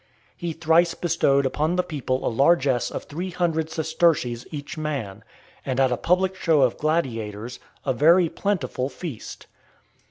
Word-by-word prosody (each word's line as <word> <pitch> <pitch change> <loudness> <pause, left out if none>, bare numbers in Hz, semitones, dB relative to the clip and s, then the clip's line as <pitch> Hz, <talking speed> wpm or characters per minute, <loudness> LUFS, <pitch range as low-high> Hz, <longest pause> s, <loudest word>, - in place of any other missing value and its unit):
He 175 -2 -4
thrice 165 +1 +3
bestowed 145 -5 +2
upon 150 +6 0
the 180 - +2
people 135 -5 -3
a - - +1
largess 135 0 +2
of - - -5
three 175 +5 -5
hundred 165 -3 -1
sesterces 160 -7 0
each 145 -2 -7
man; 135 -10 -4 0.4
and, 130 -1 -2
at 130 -1 +3
a - - +2
public 185 +6 +1
show 160 -6 +3
of 125 - +2
gladiators, 120 -8 -2 0.3
a 135 - +1
very 165 +7 +5
plentiful 155 -9 -2
feast. 140 -4 -8
155 Hz, 150 wpm, -24 LUFS, 130-170 Hz, 0.4 s, very